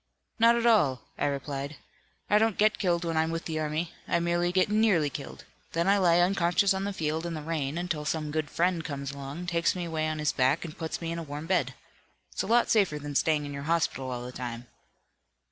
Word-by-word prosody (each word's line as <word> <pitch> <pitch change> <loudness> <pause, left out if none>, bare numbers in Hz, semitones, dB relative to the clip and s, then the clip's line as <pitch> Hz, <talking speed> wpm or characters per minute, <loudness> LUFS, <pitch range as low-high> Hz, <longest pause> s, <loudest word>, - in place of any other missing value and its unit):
'Not 230 +1 +6
at 235 0 0
all,' 145 - +3 0.2
I 145 - +2
replied. 140 +1 -4 0.5
'I 210 - +4
don't 220 -2 +2
get 215 +1 +3
killed 175 -3 +1
when 165 -1 -1
I'm 160 +1 +2
with 165 0 -3
the 160 -1 -2
army. 155 +2 -2 0.2
I 170 - +2
merely 175 +1 +1
get 185 +2 +3
nearly 210 -8 +3
killed. 140 - -8 0.3
Then 170 +2 +1
I 200 +1 +4
lie 175 -3 +4
unconscious 180 +1 +3
on 190 +1 -2
the 200 - -1
field, 160 -3 -2
in 170 -1 -3
the 155 - -6
rain, 155 -2 -2
until 175 -4 -2
some 155 0 -2
good 155 -1 -2
friend 175 -1 +1
comes 140 -3 -4
along, 140 +5 -7
takes 170 0 +1
me 180 -1 -3
away 160 -1 -1
on 155 0 -2
his 150 -1 +1
back 130 +6 +2
and 155 - -8
puts 160 +1 -4
me 165 0 -3
in 170 - -3
a - - -4
warm 150 +1 -6
bed. 160 -8 0 0.6
It's - - -2
a - - -4
lot 235 +2 +3
safer 195 -9 +3
than 145 0 -6
staying 150 +1 +2
in 145 - -6
your 140 - -5
hospital 165 -6 0
all 125 -1 -4
the 125 - -6
time.'" 120 -1 -6
165 Hz, 230 wpm, -28 LUFS, 145-175 Hz, 0.6 s, Not